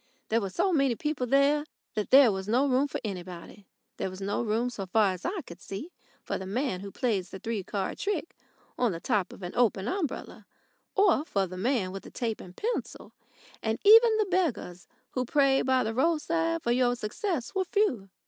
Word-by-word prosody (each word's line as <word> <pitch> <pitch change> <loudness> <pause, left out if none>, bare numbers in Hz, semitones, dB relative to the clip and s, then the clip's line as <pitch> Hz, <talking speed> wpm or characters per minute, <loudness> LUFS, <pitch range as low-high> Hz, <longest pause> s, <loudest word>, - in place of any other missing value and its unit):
There 230 +1 +2
were 195 - -3
so 365 - +1
many 275 -5 +3
people 300 -2 -2
there 280 +3 +3 0.3
that 210 -1 -2
there 265 -4 +8
was 190 0 -4
no 245 +6 +3
room 270 +1 +2
for - - -4
anybody. 185 -1 -7 0.3
There - - -2
was 185 0 -9
no 200 +3 -1
room, 230 +2 0
so 195 -5 -6
far 200 0 +3
as 180 - -9
I 375 -1 -2
could 175 - -12
see, 255 - -7 0.3
for - - -3
the 190 - -6
man 235 -1 -1
who 200 +1 -7
plays 205 -9 -1
the - - -7
three 220 0 -3
card 195 0 -3
trick 385 -4 -2 0.4
on 240 -6 +2
the 165 - -5
top 205 -2 0
of - - -12
an 180 - -5
open 215 -4 +2
umbrella, 360 -1 -4 0.5
or 390 -7 +4
for 200 -11 0
the 185 0 -8
man 200 -1 0
with 195 0 -6
the - - -12
tape 225 -3 -3
and 180 0 -13
pencil, 470 +3 -4 0.5
and 220 0 -1
even 450 +2 +8
the 430 - +2
beggars 285 - -1 0.2
who 255 - -1
prayed 270 +1 +2
by 260 -1 +3
the 220 - -2
roadside 330 +4 +1
for 235 - +1
your 245 0 +3
success 250 - -3
were 385 -1 +1
few. 285 - 0
240 Hz, 205 wpm, -28 LUFS, 195-300 Hz, 0.5 s, there